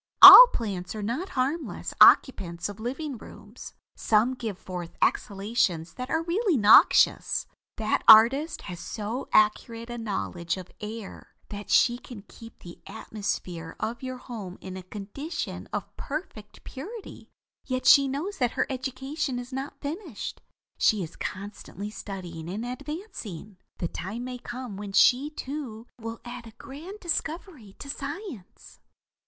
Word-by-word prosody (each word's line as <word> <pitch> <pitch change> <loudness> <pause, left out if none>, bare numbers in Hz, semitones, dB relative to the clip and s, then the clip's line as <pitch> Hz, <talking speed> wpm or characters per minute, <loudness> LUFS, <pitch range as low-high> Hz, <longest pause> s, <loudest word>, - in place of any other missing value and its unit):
All - - +14
plants 195 -4 -4
are 215 - -5
not 255 - -3
harmless 285 +6 -2
occupants 175 -9 +5
of 205 -1 -8
livingrooms. 260 +2 -7 0.2
Some 225 +4 +2
give 225 -6 -5
forth 180 -3 -8
exhalations 195 -5 0
that 250 +1 -7
are 320 +2 0
really 360 - +1
noxious. 210 -1 +5 0.3
That 220 -1 0
artist 270 +9 +6
has 175 -1 -7
so 225 +4 -5
accurate 230 +2 +1
a 240 - -5
knowledge 190 -5 -3
of 185 -1 -10
air 215 -1 -8
that 205 0 -8
she 240 0 +4
can 230 -6 -11
keep 230 0 -14
the 170 -1 -11
atmosphere 175 -6 -5
of 235 +3 -4
your 255 -1 -5
home 215 -8 -8
in 185 -1 -8
a 190 - -6
condition 215 - -6
of - - -5
perfect 275 - -7
purity; 395 - -9 0.4
yet 255 -1 -2
she 280 -1 +7
knows 315 +9 -4
that 245 -2 +1
her - - 0
education 265 +1 -3
is 245 +1 -7
not 270 +2 -6
finished. 305 - -6 0.4
She 210 -4 +3
is 165 - -9
constantly 200 0 -7
studying 175 -6 -8
and 210 +6 -4
advancing. 245 - -7 0.2
The 170 - -2
time 200 +9 -6
may 250 0 -6
come 240 -4 -7
when 200 -1 -7
she, 260 +7 +4
too, 265 -6 -7
will 225 0 -7
add 240 -1 -8
a 225 - -13
grand 330 +10 -10
discovery 320 - -4
to - - -10
science. 285 - -8
235 Hz, 140 wpm, -26 LUFS, 205-275 Hz, 0.4 s, All